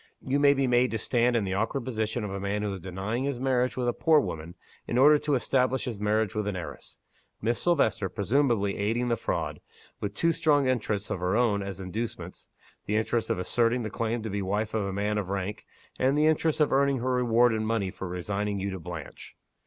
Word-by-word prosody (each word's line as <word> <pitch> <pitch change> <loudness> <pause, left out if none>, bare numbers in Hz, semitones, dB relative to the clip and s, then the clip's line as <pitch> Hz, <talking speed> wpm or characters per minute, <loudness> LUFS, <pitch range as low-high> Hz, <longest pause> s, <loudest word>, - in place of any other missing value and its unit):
You 135 +2 0
may 145 0 +5
be 135 0 +1
made 125 0 +3
to 115 - -2
stand 120 +2 +1
in 115 - +2
the 95 -1 -2
awkward 115 +5 -1
position 110 -2 -2
of 105 - -4
a 100 - -4
man 100 +2 -2
who 105 -1 -2
is 95 - -6
denying 95 +8 -3
his 140 -3 -2
marriage 125 -1 +1
with 125 -1 0
a 120 - +2
poor 160 +3 +4
woman, 85 - -5 0.3
in 120 - -1
order 150 +3 +7
to 145 -1 0
establish 130 0 +1
his 115 -5 -4
marriage 105 0 +1
with 105 -1 -2
an 105 - -2
heiress: 90 -3 -8 0.4
Miss 115 +2 -1
Silvester 110 - +2
presumably 110 -1 +1
aiding 115 +4 0
the 120 - +2
fraud, - - -3 0.4
with 100 0 -4
two 165 +8 +2
strong 150 -4 +2
interests 110 -5 -1
of - - -2
her 90 +2 0
own 110 -5 +2
as 95 -1 -6
inducements 105 +5 -6 0.4
the 105 - 0
interest 110 +1 0
of - - +1
asserting 115 +6 +1
the 110 - -4
claim 115 -1 -2
to 110 - -4
be 100 - -2
the 95 - -3
wife 105 +3 -1
of 110 -2 0
a - - -3
man 105 +2 -1
of 95 -3 -4
rank, 100 +2 -4 0.3
and 135 +3 +2
the 150 - +4
interest 160 0 +2
of 150 - +3
earning 140 0 +3
her 130 +1 -1
reward 120 -1 +3
in 110 0 -1
money 110 -4 -1
for 95 - -6
resigning 100 +3 -2
you 100 +1 -2
to 95 - -5
Blanche. 85 -3 -9
110 Hz, 230 wpm, -27 LUFS, 100-125 Hz, 0.4 s, order